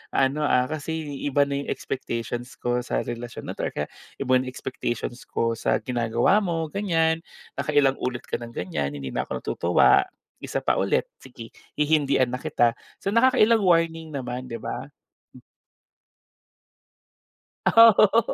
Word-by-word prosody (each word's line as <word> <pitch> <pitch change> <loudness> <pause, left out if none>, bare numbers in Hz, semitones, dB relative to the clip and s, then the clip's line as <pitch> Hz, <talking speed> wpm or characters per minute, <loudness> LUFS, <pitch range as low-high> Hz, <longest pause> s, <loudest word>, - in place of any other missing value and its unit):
ano, 140 +3 +2
ah, 125 - +3
kasi 155 -2 -4
iba 145 0 +3
na 140 0 -2
'yung 140 - -6
expectations 120 -1 -4
ko 120 0 -1
sa 125 - -2
relasyon 120 0 -6
na - - -1
'to - - -3
or - - -7
kaya, 75 - -3 0.2
iba 135 -2 -3
'yung 130 - -4
expectations 125 -1 -5
ko 115 0 0
sa 110 - +1
ginagawa 120 - +2
mo, 165 -5 -2
ganiyan. 165 -5 +1 0.4
Nakailang 145 -3 +2
ulit 125 -1 -3
ka - - -4
nang 120 0 -9
ganiyan. 75 -5 -3
Hindi 70 -2 -6
na - - -2
ako - - -5
tutuwa. 85 +1 +3 0.3
Isa - - -4
pa - - +2
ulit, - - +1
sige, 120 -3 -11 0.2
hihindian 145 -4 +2
na 125 - -2
kita." 120 -2 +2 0.3
So - - -1
nakakailang 230 -1 +4
warning 165 -2 +1
naman, 125 -1 -4
di 115 -2 -6
ba? - - -6 2.8
Oh, 230 0 +9
oho, 215 +2 +5
135 Hz, 150 wpm, -25 LUFS, 120-160 Hz, 2.8 s, Oh